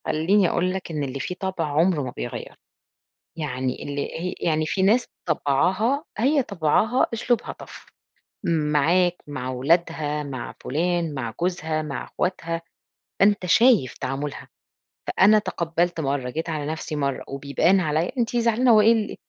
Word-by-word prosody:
خليني 180 +5 +3
أقول 185 +1 0
لك 190 -2 -5
إن 150 -2 -2
اللي 135 0 -4
فيه 180 - -4
طبع 190 -3 -2
عمرُه 155 +2 +2
ما 125 - -4
بيغيرُه، - - -6 0.8
يعني 130 -5 -3
اللي 145 0 -3 0.2
هي 180 +2 -3
يعني 155 -1 +1
في 190 +5 -1
ناس 220 +6 +4 0.2
طبعها، 185 - +1
هي 275 +5 +3
طبعها 205 - +1
أسلوبها 230 +1 -1
tough - - -12 0.6
معاك 165 +2 +2
مع 130 -3 -5
ولادها 150 +2 0
مع 135 -4 -6
فلان 165 +2 0
مع 120 -5 -4
جوزها 160 -3 -1
مع 140 -5 -5
إخواتها، 165 -2 -3 0.6
أنت 200 -1 +4
شايف 185 - +4
تعامُلها، 135 +2 -4 0.6
فأنا 210 +3 +5
تقبّلت 170 -3 -1
مرّه، 135 -3 -1
جيت 160 +6 -4
على 155 -2 -3
نفسي 155 -1 -5
مرّه 140 -2 -1
وبيبان 140 +7 +1
عليَّ 160 0 0
أنتِ 240 0 0
زعلانة 235 +1 +3
وإيه 215 +1 +6
ال 220 -2 -2
165 Hz, 145 wpm, -24 LUFS, 145-190 Hz, 0.8 s, وإيه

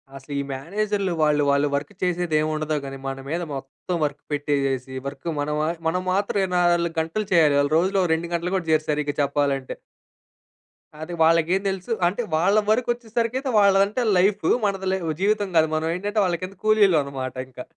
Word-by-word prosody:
అసలు 135 +2 -11
ఈ - - 0
మేనేజర్‌లు 200 +7 -2
వాళ్ళు, 150 -1 +3
వాళ్ళు 140 +1 +3
వర్క్ 145 +8 -4
చేసేది 175 -3 0
ఏమి 155 0 0
ఉండదు. 155 0 -2
కానీ 135 0 -6
మన 135 0 -3
మీద 170 +3 -2
మొత్తం 135 +6 -5
వర్క్ 145 0 -5
పెట్టేసేసి 135 -3 -1
వర్క్ 140 +4 -8
మనం 150 +1 -1
మా 155 - 0 0.2
మనం 180 +3 0
మాత్రం 200 +2 0
24 175 -2 +1
గంటలు 165 +6 -2
చేయాలి. 155 -4 +5
వాళ్ళు 145 +1 +1
రోజులో 190 +3 +1
ఓ - - -2
2 165 +1 -2
గంటలు 170 +2 -1
గూడా 180 -4 -2
జేయరు 155 -1 +2
సరిగ్గా 150 -1 -1
చెప్పాలంటే. 140 -1 0 1.3
అది 165 +3 -6
వాళ్ళకేం 165 +3 +3
తెలుసు 190 +3 -5 0.2
అంటే 195 +7 -1
వాళ్ళ 180 +6 +3
వరకొచ్చేసరికైతే 240 +2 0
వాళ్ళదంటే 200 +3 +3 0.2
లైఫూ. 195 +3 +2 0.2
మనది 195 -2 -1
ల - - +2 0.3
జీవితం 205 0 +1
కాదు. 160 -1 +4
మనం 155 +1 -1
ఏంటంటే 205 +4 -2
వాళ్ళ 175 -2 0
కింద 185 +2 -6
కూలీలవనమాట 150 - +2
ఇంకా. 125 -1 -9
170 Hz, 170 wpm, -23 LUFS, 145-195 Hz, 1.3 s, చేయాలి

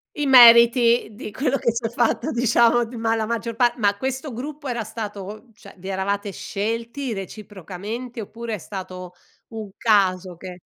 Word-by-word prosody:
I 295 -2 -1
meriti 235 -2 +7
di 215 -1 -8
quello 270 +3 0
che 235 - 0
si 235 - -4
è - - 0
fatto 240 +5 0
diciamo, 235 0 +3
d 235 - -13
ma 225 -1 0
la 220 - -1
maggior 230 0 -3
pa 240 0 +3
ma 205 -2 +1
questo 265 +3 -4
gruppo 285 +4 -7
era 235 -2 -2
stato 210 0 -7
cioè, - - -15
vi 190 - -10
eravate 200 +1 -2
scelti 230 +6 -4
reciprocamente, 205 +4 -7
oppure 230 +2 -7
è - - -2
stato 185 -2 -8 0.4
un 215 -3 -7
caso 185 -5 +1
che 180 0 -10
225 Hz, 170 wpm, -22 LUFS, 200-240 Hz, 0.4 s, meriti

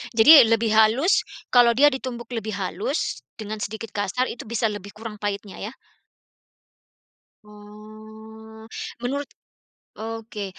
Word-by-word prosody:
Jadi 225 +7 +7 0.2
lebih 225 0 +2
halus, 220 - +4 0.3
kalau 240 -2 +5
dia 290 +4 +6
ditumbuk 250 -3 -6
lebih 220 -3 -4
halus, 195 - -3 0.2
dengan 215 0 -6
sedikit 220 +1 -6
kasar 205 +5 -1
itu 235 - -9
bisa 225 -1 0
lebih 205 -1 -9
kurang 215 -1 -8
pahitnya 200 -1 -5
ya. 210 - -5 1.7
Oh, 215 +1 -14 0.3
menurut 280 +4 -2 0.7
oke, 225 -1 -6
220 Hz, 115 wpm, -23 LUFS, 210-235 Hz, 1.7 s, Jadi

